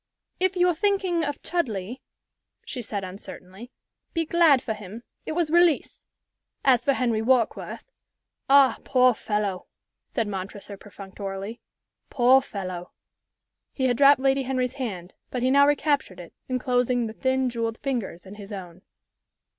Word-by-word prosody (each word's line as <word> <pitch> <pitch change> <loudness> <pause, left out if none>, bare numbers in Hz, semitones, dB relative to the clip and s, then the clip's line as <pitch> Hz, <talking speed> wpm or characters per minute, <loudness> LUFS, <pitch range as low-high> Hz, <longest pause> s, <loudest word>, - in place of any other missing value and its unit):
"If 375 0 +1
you're 355 0 +3
thinking 375 -2 0
of 290 -1 -4
Chudleigh," 240 - -2 0.7
she 255 - -5
said, 205 -3 -4
uncertainly, 190 +3 -10 0.5
"be 330 0 +1
glad 325 -4 +5
for 235 -3 -3
him. 210 +2 -10 0.2
It - - -2
was 330 -2 0
release. 345 -3 +3 0.6
As 255 -3 +4
for 275 - +3
Henry 235 -4 0
Warkworth 250 - 0 0.3
" - - -55
"Ah, 270 -3 +6
poor 255 -1 +4
fellow!" 210 -4 -3 0.4
said 230 -4 -2
Montresor, 200 +1 -6
perfunctorily. 195 +2 -8 0.5
"Poor 260 +1 +5
fellow!" 185 -7 -6 0.8
He 260 - -1
had 245 -2 +2
dropped 280 0 +6
Lady 270 0 +2
Henry's 255 -1 -1
hand, 185 -7 -5 0.2
but 250 -1 -3
he 255 - +3
now 280 +1 +6
recaptured 290 - 0
it, 175 - -11 0.2
enclosing 250 -1 +1
the 220 - -5
thin, 260 +2 0
jewelled 230 -2 -2
fingers 230 -11 -4
in 190 - -10
his 205 0 -11
own. 180 -3 -8
245 Hz, 145 wpm, -25 LUFS, 205-275 Hz, 0.8 s, Ah